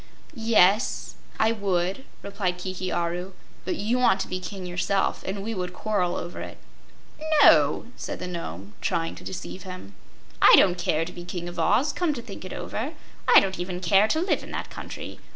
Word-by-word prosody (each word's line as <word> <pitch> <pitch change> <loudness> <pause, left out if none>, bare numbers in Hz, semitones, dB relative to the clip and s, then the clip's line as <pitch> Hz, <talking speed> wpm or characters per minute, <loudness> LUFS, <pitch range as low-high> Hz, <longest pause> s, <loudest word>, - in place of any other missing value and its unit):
"Yes, 220 - +3 0.3
I 220 0 +4
would," 195 +2 -1 0.2
replied 195 -3 -2
Kiki 185 0 -4
Aru; 175 +2 -2 0.3
"but 185 - -1
you 225 +5 0
want 220 -6 +4
to - - -3
be 185 - -3
king 185 +1 -7
yourself, 180 +2 0
and 195 +1 -3
we 225 +2 -3
would 180 -3 -4
quarrel 190 -5 0
over 175 - -5
it." - - -8 0.9
"No," 150 - +6
said - - -5
the - - -6
Nome, 105 - -6
trying 165 0 -1
to - - -12
deceive 185 0 -6
him. 185 - -9 0.5
"I - - +9
don't 180 -2 +4
care 165 -1 +1
to 180 - -7
be 175 - -8
King 175 -1 -5
of 175 0 -6
Oz, 275 - +3
come 335 -5 0
to 235 - -5
think 200 -5 -9
it 185 - -7
over. 270 +9 -4 0.3
I - - +9
don't 190 -2 -2
even 180 0 -3
care 195 +4 +4
to 315 - +1
live 365 - +1
in - - -10
that - - -5
country. - - -8
185 Hz, 190 wpm, -26 LUFS, 175-205 Hz, 0.9 s, I